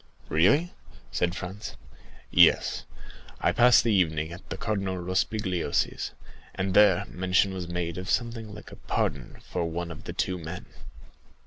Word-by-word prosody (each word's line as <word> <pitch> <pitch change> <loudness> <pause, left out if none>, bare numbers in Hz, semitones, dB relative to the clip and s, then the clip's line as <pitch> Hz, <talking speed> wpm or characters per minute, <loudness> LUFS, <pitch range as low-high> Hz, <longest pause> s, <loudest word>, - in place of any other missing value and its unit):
"Really?" 140 - +3 0.4
said 90 0 0
Franz. 95 +3 -6 0.6
"Yes, - - +4 0.5
I - - +2
passed 125 0 +6
the 115 - +2
evening 80 -4 +1
at 90 - -11
the - - -4
Cardinal 100 -4 -2
Rospigliosi's, 95 +1 -1 0.5
and 95 0 -1
there 100 -3 +5
mention 95 +1 +1
was 90 -2 -5
made 85 0 -3
of 90 - -6
something 115 -3 -1
like 105 0 -11
a - - -11
pardon 65 -4 -2
for - - -1
one 85 +1 -4
of 80 - -10
the - - -5
two 90 -1 -1
men." 80 +2 -7
95 Hz, 145 wpm, -27 LUFS, 85-105 Hz, 0.6 s, passed